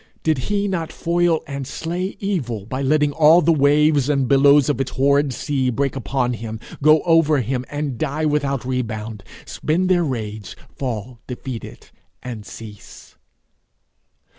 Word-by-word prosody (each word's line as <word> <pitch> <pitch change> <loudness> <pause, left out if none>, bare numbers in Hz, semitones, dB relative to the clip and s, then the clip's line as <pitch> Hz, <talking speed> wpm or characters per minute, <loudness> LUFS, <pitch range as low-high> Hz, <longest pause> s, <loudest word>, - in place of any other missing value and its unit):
Did 155 -4 +1
he 205 0 +1
not 170 -5 -3
foil 170 -1 +1
and 140 -2 -5
slay 175 +7 -4
evil 130 - -3
by 130 +5 -4
letting 145 +1 +2
all 160 +3 +6
the 170 -1 +3
waves 145 -1 +3
and 140 -3 +1
billows 140 +1 +5
of 135 -3 0
its 130 - -2
horrid 140 +1 +2
sea 130 +1 -1
break 135 +2 -1
upon 125 +1 -1
him, 110 -1 -6 0.2
go 155 +1 +5
over 165 -3 +4
him, 125 +2 -2
and 145 -5 -4
die 155 +1 -1
without 140 -4 0
rebound 110 -5 -4 0.2
spend 180 +4 -1
their 175 -2 +3
rage, 110 - -5 0.2
fall 120 -2 -5
defeated, 125 -1 -8 0.3
and 115 -5 -7
cease? 105 -3 -12
140 Hz, 145 wpm, -21 LUFS, 125-155 Hz, 0.3 s, all